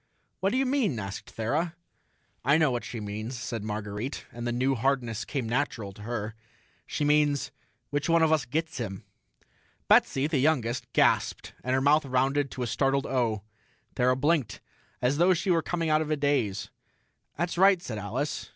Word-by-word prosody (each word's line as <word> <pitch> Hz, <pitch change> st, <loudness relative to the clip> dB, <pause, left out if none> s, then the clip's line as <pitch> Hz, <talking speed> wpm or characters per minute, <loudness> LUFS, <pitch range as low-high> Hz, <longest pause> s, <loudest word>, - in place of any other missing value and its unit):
"What 195 Hz, -, +1 dB
do 255 Hz, -, +1 dB
you 270 Hz, -, +2 dB
mean?" 255 Hz, -, +1 dB
asked 100 Hz, -1 st, -6 dB
Thera. 150 Hz, +10 st, -1 dB, 0.7 s
"I 140 Hz, +5 st, +4 dB
know 155 Hz, -4 st, +3 dB
what 120 Hz, -1 st, -2 dB
she 120 Hz, -, -6 dB
means," 110 Hz, +4 st, -5 dB
said 120 Hz, -3 st, -4 dB
Marguerite, 105 Hz, +4 st, -4 dB
and 120 Hz, 0 st, -5 dB
the -, -, 0 dB
new 130 Hz, +3 st, +1 dB
hardness 120 Hz, -3 st, 0 dB
came 135 Hz, -6 st, -3 dB
natural 115 Hz, -4 st, -1 dB
to 105 Hz, -, -13 dB
her. 110 Hz, -1 st, -4 dB, 0.5 s
"She 150 Hz, -, -1 dB
means, 145 Hz, -2 st, +2 dB, 0.4 s
which 145 Hz, +3 st, -1 dB
one 165 Hz, 0 st, +5 dB
of 160 Hz, -, +3 dB
us 155 Hz, -3 st, +2 dB
gets 160 Hz, +2 st, -2 dB
him?" 100 Hz, -5 st, -5 dB, 0.8 s
Betsy, 135 Hz, +1 st, +4 dB
the 150 Hz, -2 st, +1 dB
youngest, 130 Hz, -4 st, +1 dB
gasped, -, -, +2 dB
and 130 Hz, +1 st, +1 dB
her 130 Hz, -, +2 dB
mouth 145 Hz, +2 st, +4 dB
rounded 135 Hz, +2 st, +1 dB
to 125 Hz, -, -4 dB
a -, -, 0 dB
startled 135 Hz, +4 st, +1 dB
O. 115 Hz, -6 st, 0 dB, 0.5 s
Thera 125 Hz, 0 st, +3 dB
blinked, 145 Hz, -7 st, +1 dB, 0.4 s
as 130 Hz, +3 st, +2 dB
though 180 Hz, +2 st, +5 dB
she 175 Hz, +3 st, 0 dB
were 165 Hz, -2 st, +3 dB
coming 165 Hz, -1 st, -1 dB
out 155 Hz, 0 st, +4 dB
of 155 Hz, -, -3 dB
a 155 Hz, -, +1 dB
daze. 140 Hz, -9 st, 0 dB, 0.7 s
"That's 170 Hz, +2 st, -1 dB
right," 190 Hz, +1 st, +5 dB
said 115 Hz, -10 st, -5 dB
Alice. 120 Hz, +9 st, -3 dB
135 Hz, 180 wpm, -28 LUFS, 115-155 Hz, 0.8 s, one